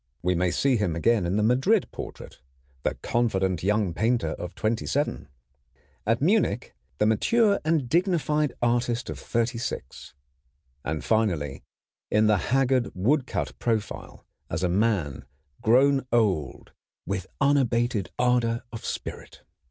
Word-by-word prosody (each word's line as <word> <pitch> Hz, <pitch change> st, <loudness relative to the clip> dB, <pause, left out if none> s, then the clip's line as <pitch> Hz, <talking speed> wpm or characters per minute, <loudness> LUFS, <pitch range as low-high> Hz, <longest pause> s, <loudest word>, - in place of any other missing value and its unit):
We 90 Hz, +1 st, +2 dB
may 90 Hz, +1 st, +1 dB
see 130 Hz, +7 st, +2 dB
him 95 Hz, -7 st, 0 dB
again 100 Hz, +2 st, +2 dB
in 95 Hz, +4 st, 0 dB
the 105 Hz, -, +2 dB
Madrid 135 Hz, -, +3 dB
portrait, -, -, -9 dB, 0.4 s
the -, -, -1 dB
confident 95 Hz, -7 st, 0 dB
young 105 Hz, -2 st, +1 dB
painter 115 Hz, +6 st, +1 dB
of 90 Hz, -, -6 dB
twenty 110 Hz, +1 st, -1 dB
seven; 140 Hz, -, -1 dB, 0.8 s
at 115 Hz, +4 st, +2 dB
Munich, 200 Hz, +6 st, +1 dB, 0.2 s
the -, -, +2 dB
mature 200 Hz, -, +3 dB
and 155 Hz, -4 st, +1 dB
dignified 155 Hz, -3 st, +1 dB
artist 120 Hz, 0 st, 0 dB
of -, -, -7 dB
thirty 115 Hz, 0 st, -1 dB
six; 70 Hz, -, -6 dB, 0.7 s
and 75 Hz, 0 st, -3 dB
finally, 85 Hz, -11 st, 0 dB, 0.5 s
in 105 Hz, +1 st, +3 dB
the 105 Hz, -1 st, +4 dB
haggard 130 Hz, -1 st, +2 dB
woodcut 125 Hz, +8 st, 0 dB
profile, 110 Hz, -3 st, -3 dB, 0.2 s
as 90 Hz, -, -2 dB
a 90 Hz, -, +2 dB
man 95 Hz, -, 0 dB, 0.4 s
grown 135 Hz, +3 st, +4 dB
old 100 Hz, -, 0 dB, 0.3 s
with 95 Hz, -1 st, -3 dB
unabated 120 Hz, -8 st, +2 dB
ardor 120 Hz, -2 st, +1 dB
of 115 Hz, -, -7 dB
spirit. -, -, -6 dB
115 Hz, 130 wpm, -26 LUFS, 95-130 Hz, 0.8 s, the